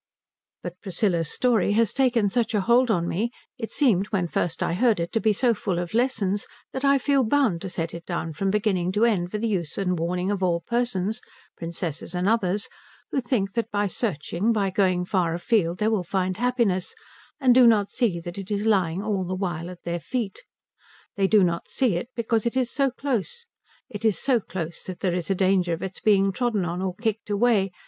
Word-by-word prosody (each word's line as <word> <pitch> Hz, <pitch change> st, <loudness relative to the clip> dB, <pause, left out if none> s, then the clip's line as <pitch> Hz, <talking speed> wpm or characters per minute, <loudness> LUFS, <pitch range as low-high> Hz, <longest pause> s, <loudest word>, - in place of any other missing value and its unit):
But 175 Hz, 0 st, -7 dB
Priscilla's 175 Hz, -4 st, 0 dB
story 225 Hz, -5 st, +2 dB
has 225 Hz, -1 st, +2 dB
taken 245 Hz, -6 st, +2 dB
such 230 Hz, +2 st, 0 dB
a 205 Hz, -, +2 dB
hold 240 Hz, +4 st, +3 dB
on 170 Hz, -5 st, +1 dB
me, 215 Hz, +8 st, -1 dB, 0.3 s
it 225 Hz, -, -5 dB
seemed 205 Hz, -9 st, +2 dB
when 190 Hz, -5 st, -1 dB
first 165 Hz, 0 st, -1 dB
I -, -, 0 dB
heard 220 Hz, +1 st, +2 dB
it 170 Hz, 0 st, -2 dB
to 225 Hz, -, +1 dB
be 220 Hz, -, +3 dB
so 235 Hz, +3 st, +2 dB
full 195 Hz, -4 st, -2 dB
of 175 Hz, +1 st, -4 dB
lessons, 220 Hz, -5 st, 0 dB, 0.3 s
that 265 Hz, -, -4 dB
I 280 Hz, 0 st, +5 dB
feel 275 Hz, 0 st, +2 dB
bound 225 Hz, -8 st, +2 dB
to 190 Hz, -, -5 dB
set 165 Hz, -2 st, -3 dB
it 170 Hz, -, -7 dB
down 170 Hz, -2 st, -3 dB
from 195 Hz, +6 st, -1 dB
beginning 190 Hz, -3 st, +1 dB
to 210 Hz, +3 st, +3 dB
end 185 Hz, -7 st, +1 dB
for 210 Hz, -, -3 dB
the 230 Hz, +2 st, -1 dB
use 175 Hz, -7 st, -2 dB
and 180 Hz, -3 st, 0 dB
warning 180 Hz, +3 st, -1 dB
of 200 Hz, -2 st, -2 dB
all 175 Hz, -2 st, +1 dB
persons, 225 Hz, +1 st, -1 dB, 0.3 s
princesses 165 Hz, 0 st, -5 dB
and 180 Hz, +2 st, 0 dB
others, 205 Hz, -3 st, +1 dB, 0.4 s
who 270 Hz, -, 0 dB
think 220 Hz, -6 st, -1 dB
that 230 Hz, -1 st, -1 dB
by 205 Hz, 0 st, 0 dB
searching, 195 Hz, -, -1 dB
by 200 Hz, -4 st, +1 dB
going 185 Hz, -2 st, +1 dB
far 175 Hz, -3 st, 0 dB
afield, 175 Hz, -2 st, +1 dB
they 210 Hz, -, 0 dB
will 215 Hz, -4 st, +1 dB
find 185 Hz, +1 st, -1 dB
happiness, 235 Hz, -7 st, 0 dB, 0.4 s
and 260 Hz, -3 st, +5 dB
do 250 Hz, -1 st, +7 dB
not 210 Hz, -3 st, +3 dB
see 205 Hz, -9 st, 0 dB
that 175 Hz, +3 st, -7 dB
it 195 Hz, -, -8 dB
is 205 Hz, 0 st, -1 dB
lying 190 Hz, -4 st, +1 dB
all 205 Hz, -3 st, -1 dB
the 185 Hz, +1 st, -3 dB
while 175 Hz, -3 st, -3 dB
at 180 Hz, -1 st, -11 dB
their 170 Hz, 0 st, -2 dB
feet. 200 Hz, -, -4 dB, 0.7 s
They 195 Hz, -1 st, +2 dB
do 210 Hz, -1 st, +5 dB
not 170 Hz, -1 st, -1 dB
see 245 Hz, -9 st, +1 dB
it 180 Hz, +8 st, -3 dB
because 230 Hz, -1 st, 0 dB
it 235 Hz, -, -2 dB
is 250 Hz, -2 st, 0 dB
so 275 Hz, -1 st, +2 dB
close. 275 Hz, -, -3 dB, 0.4 s
It 215 Hz, -4 st, -8 dB
is 215 Hz, -6 st, +2 dB
so 255 Hz, +2 st, +2 dB
close 170 Hz, -5 st, -6 dB
that 185 Hz, -2 st, -7 dB
there 185 Hz, -3 st, +1 dB
is 175 Hz, 0 st, -3 dB
a 195 Hz, -, +2 dB
danger 185 Hz, -2 st, +2 dB
of 165 Hz, -, -4 dB
its 190 Hz, -1 st, -6 dB
being 195 Hz, -4 st, +3 dB
trodden 220 Hz, -3 st, 0 dB
on 175 Hz, +1 st, -3 dB
or 185 Hz, -1 st, -2 dB
kicked 220 Hz, 0 st, -3 dB
away. 205 Hz, -2 st, +2 dB
200 Hz, 215 wpm, -25 LUFS, 180-230 Hz, 0.7 s, do